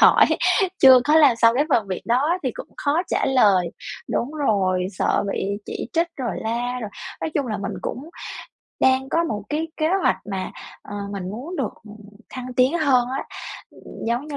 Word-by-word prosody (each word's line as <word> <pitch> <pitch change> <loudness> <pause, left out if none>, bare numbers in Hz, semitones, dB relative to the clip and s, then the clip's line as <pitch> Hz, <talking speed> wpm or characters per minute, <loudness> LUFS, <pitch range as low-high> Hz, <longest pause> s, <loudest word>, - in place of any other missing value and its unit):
hỏi - - +7 0.5
chưa 260 -2 +8
có 300 +3 +4
làm 285 -7 +6
xong 230 0 +5
cái 285 +4 +2
phần 230 -8 +2
việc 185 - -4
đó 285 +10 +2
thì - - 0
cũng - - -8
khó 300 +4 +1
trả - - 0
lời 200 -10 +4 0.4
đúng 240 - -1
rồi, 195 -11 +1
sợ - - +2
bị - - -2 0.2
chỉ - - -5
trích 335 +1 +1
rồi 250 -4 -3
la. 240 +3 -2
Rồi 215 -3 -5 0.3
nói - - -2
chung 280 -3 0
là 215 - -2
mình 200 - -4
cũng 275 +6 -5 0.7
đang 260 0 +3
có 335 +4 +1
một 210 -9 -3
cái 315 +2 -2
kế 310 - +1 0.2
hoạch - - +3
mà, 190 -1 -3 0.3
ờ, 205 - -9 0.2
mình 190 -2 -4
muốn 275 - -6
được 260 -6 -2 0.6
thăng 255 -1 -6
tiến 260 +6 +3
hơn 260 -6 +3
á, 265 +2 -3 0.5
ừm, - - -11
giống 240 +5 -1
như 295 -2 -5
255 Hz, 190 wpm, -22 LUFS, 220-295 Hz, 0.7 s, chưa